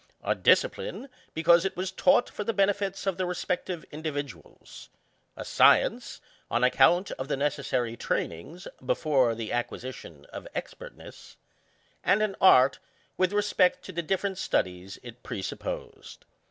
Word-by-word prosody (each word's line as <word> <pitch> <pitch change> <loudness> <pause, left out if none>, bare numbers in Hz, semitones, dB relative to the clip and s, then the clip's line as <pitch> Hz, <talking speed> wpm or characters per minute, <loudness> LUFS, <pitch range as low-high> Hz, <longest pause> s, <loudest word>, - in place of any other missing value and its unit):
A - - +1
discipline^ 475 - +1 0.3
because 170 +2 +5
it 190 -1 -3
was 185 0 -2
taught 270 -3 +3
for - - -6
the 225 +2 -2
benefit 200 -1 0
of 195 -2 -1
the 185 - -1
respective 180 -1 -3
individuals; 145 - -7 0.5
ŌĆö - - -6
a - - -3
science^ - - +3 0.3
on 120 +1 0
account 140 +9 +4
of 130 - -4
the 145 - -1
necessary 130 -4 -1
trainings, 120 - -4 0.2
before 130 -3 +1
the 110 -1 -5
acquisition 120 - -5
of - - -8
expertness; - - -9 0.7
ŌĆö 185 - +4
and 215 +2 +2
an 205 -2 -1
art 135 -8 +6 0.4
with 185 0 +1
respect 205 -3 +2
to - - -7
the 170 -1 -3
different 190 +3 -2
studies 90 - -2
it 120 0 -11
presupposed. 95 -4 -7
165 Hz, 140 wpm, -27 LUFS, 125-190 Hz, 0.7 s, art